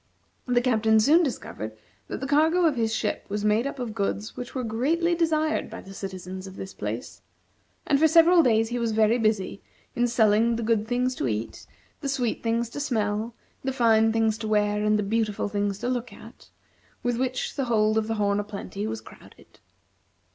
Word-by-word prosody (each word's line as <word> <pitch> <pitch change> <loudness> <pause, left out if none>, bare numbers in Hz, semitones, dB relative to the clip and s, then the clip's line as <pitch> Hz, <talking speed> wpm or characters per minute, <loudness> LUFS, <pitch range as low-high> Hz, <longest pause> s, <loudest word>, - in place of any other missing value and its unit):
The 245 -1 +3
Captain 220 -3 +3
soon 300 +10 +5
discovered 110 - -4 0.3
that - - -5
the - - -2
cargo 320 +5 +3
of 310 -4 +3
his 225 -2 0
ship 220 -1 -2
was 205 +1 -2
made 215 +5 +2
up 280 - -6
of 245 -4 -4
goods 205 0 -3
which 245 +2 -7
were 255 - -2
greatly 295 +10 +1
desired 315 -2 0
by - - -8
the 195 - -12
citizens 190 -1 -7
of 190 - -10
this 190 0 -7
place; - - -6 0.6
and 280 -2 +2
for 320 - +6
several 335 +2 +6
days 225 -5 +2
he 240 0 -2
was 230 -2 -1
very 220 +2 +3
busy 215 -3 0 0.3
in 245 -1 +2
selling 230 0 +3
the 230 - -3
good 220 -1 +1
things 250 +1 0
to 140 - -2
eat, 110 0 -4 0.3
the 280 - -3
sweet 250 -4 -1
things 230 +1 0
to - - -6
smell, 220 -4 -1 0.3
the 265 - -1
fine 225 -3 +3
things 220 -1 +1
to 220 - -4
wear, 210 -1 +1
and 210 0 +3
the 210 - 0
beautiful 215 0 -1
things 205 -1 -1
to 240 - -4
look 250 -1 -2
at, - - -14 0.5
with 245 -1 0
which 255 -1 -2
the 275 - -1
hold 215 -2 +2
of 220 -1 +1
the 225 - -1
"Horn 205 -1 +1
o' - - -1
Plenty" 205 0 -6
was 225 0 -4
crowded. - - -17
225 Hz, 200 wpm, -26 LUFS, 210-255 Hz, 0.6 s, for